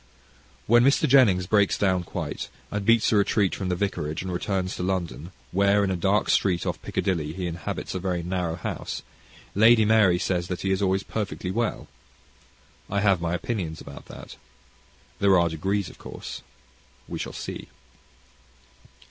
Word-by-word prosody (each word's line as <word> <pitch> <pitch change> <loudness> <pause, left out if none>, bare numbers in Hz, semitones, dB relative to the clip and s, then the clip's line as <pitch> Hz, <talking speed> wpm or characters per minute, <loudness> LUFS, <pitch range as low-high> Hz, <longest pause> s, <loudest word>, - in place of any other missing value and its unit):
When 120 +2 +5
Mr. 140 +4 +4
Jennings 115 -10 +5
breaks 100 0 +3
down 95 -2 +2
quite, - - -5 0.2
and 105 0 -2
beats 115 +2 +4
a 110 - +4
retreat 100 -1 +2
from 95 -2 -3
the 90 - +1
vicarage, 85 -5 -2
and 95 - -4
returns 95 0 -2
to - - -4
London, 90 -2 -3 0.2
where, 100 +2 +3
in 95 - 0
a - - 0
dark 95 +4 +1
street 90 -4 +2
off - - -3
Piccadilly, 80 -5 -1
he 90 +1 -4
inhabits 85 -2 -4
a 95 - -2
very 90 -2 -2
narrow 90 -2 -2
house, - - -5 0.5
Lady 110 +1 +6
Mary 105 -5 +5
says 90 -1 -1
that 90 -1 -4
he 95 - 0
is 95 +1 +1
always 95 0 +1
perfectly 100 -3 -4
well. 115 +2 -2 1.0
I 100 +1 0
have 95 -4 +3
my 85 - -1
own - - +2
opinion 90 -5 -3
about 70 0 -10
that. - - -11 0.8
There 100 -2 +5
are 85 0 +2
degrees 95 +5 -1
of - - -13
course. - - -8 0.7
We - - -5
shall - - -4
see. - - -6
95 Hz, 170 wpm, -25 LUFS, 90-105 Hz, 1.0 s, Lady